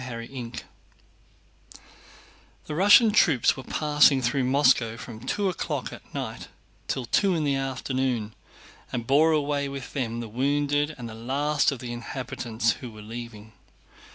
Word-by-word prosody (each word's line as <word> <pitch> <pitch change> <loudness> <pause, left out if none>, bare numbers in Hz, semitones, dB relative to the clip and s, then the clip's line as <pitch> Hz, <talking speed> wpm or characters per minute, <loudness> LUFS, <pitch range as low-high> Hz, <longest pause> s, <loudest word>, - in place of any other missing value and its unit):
CHAPTER 115 -2 -6
XXI 120 -2 -7 2.0
The 150 - -5
Russian 205 +6 +6
troops 160 - +4
were - - -7
passing 145 -1 +3
through 130 +1 0
Moscow 125 -4 +3
from 115 -1 -9
two 195 - -1
o'clock 185 - -3
at - - -13
night - - -5 0.4
till 130 -2 -2
two 190 - +2
in 160 - 0
the 140 -2 +1
afternoon 130 -4 -2 0.6
and 120 -2 -3
bore 150 +6 +4
away 145 -2 0
with 135 -2 -7
them 120 -4 -2
the 120 - -5
wounded 145 +5 0
and 120 -2 -7
the 110 - -8
last 140 +6 0
of 140 - -4
the 120 -1 -6
inhabitants 120 -2 -2
who 125 - -6
were 110 -1 -12
leaving. 110 -1 -9
130 Hz, 150 wpm, -26 LUFS, 120-145 Hz, 2.0 s, Russian